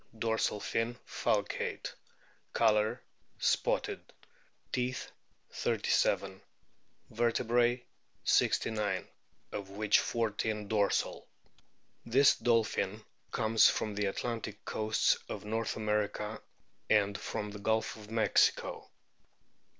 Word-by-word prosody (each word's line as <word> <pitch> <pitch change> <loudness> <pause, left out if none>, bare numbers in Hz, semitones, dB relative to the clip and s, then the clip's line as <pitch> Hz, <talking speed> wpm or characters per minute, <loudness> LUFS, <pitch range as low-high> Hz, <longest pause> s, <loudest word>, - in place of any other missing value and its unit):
Dorsal 110 -1 0
fin 115 +3 -1
falcate. - - -1 0.6
Colour 110 -1 +2 0.3
spotted. - - 0 0.7
Teeth, 125 0 -2 0.4
37. 95 -1 0 0.7
Vertebrae, 120 +1 +2 0.4
69, 105 -4 +1 0.4
of 100 -2 -5
which 105 +1 +3
14 110 -2 -1
dorsal. 100 -1 0 0.8
This 135 +4 +5
dolphin 110 -3 0 0.2
comes 110 -1 +4
from 110 - -1
the 105 0 0
Atlantic 110 0 -4
coasts 110 0 +1
of 105 0 -6
North 110 +1 -2
America 105 0 -1 0.5
and 100 -2 +3
from 105 +1 -4
the 105 - -8
Gulf 110 +2 0
of 105 -1 -12
Mexico. 110 -2 +2
110 Hz, 90 wpm, -32 LUFS, 105-115 Hz, 0.8 s, This